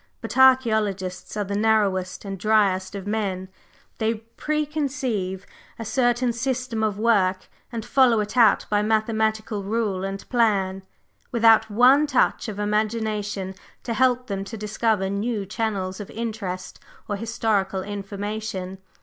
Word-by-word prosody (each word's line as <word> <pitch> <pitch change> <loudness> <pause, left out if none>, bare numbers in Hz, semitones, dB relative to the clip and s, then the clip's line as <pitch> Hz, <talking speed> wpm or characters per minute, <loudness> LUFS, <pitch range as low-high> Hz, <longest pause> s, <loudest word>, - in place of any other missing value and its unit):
But - - -6
archæologists 220 -9 +2
are - - +1
the 200 0 -4
narrowest 205 -4 +1
and 195 -1 -5
dryest 200 -2 +2
of 195 -1 -6
men, 195 -3 -2 0.5
they 225 +1 +1
preconceive 260 -5 -3 0.3
a 225 - -6
certain 245 +1 +1
system 250 -1 -2
of 215 -2 0
work 195 -4 +2 0.3
and 230 -2 -5
follow 240 -2 +4
it 210 +2 -3
out 230 -4 +5
by 205 0 +2
mathematical 220 -1 0
rule 200 -2 -1
and 195 0 -5
plan, 200 -6 +1 0.5
without 225 -2 +5
one 255 +7 +5
touch 260 -3 +1
of 210 -2 -5
imagination 210 -2 -1 0.3
to 235 - -2
help 250 0 +2
them 195 -4 -3
to 225 +3 -7
discover 215 -1 0
new 205 +1 -2
channels 195 -2 -3
of 205 - -7
interest 200 -6 -5 0.3
or 205 - -2
historical 200 -3 -1
information. 200 -1 -5
215 Hz, 130 wpm, -24 LUFS, 195-230 Hz, 0.5 s, out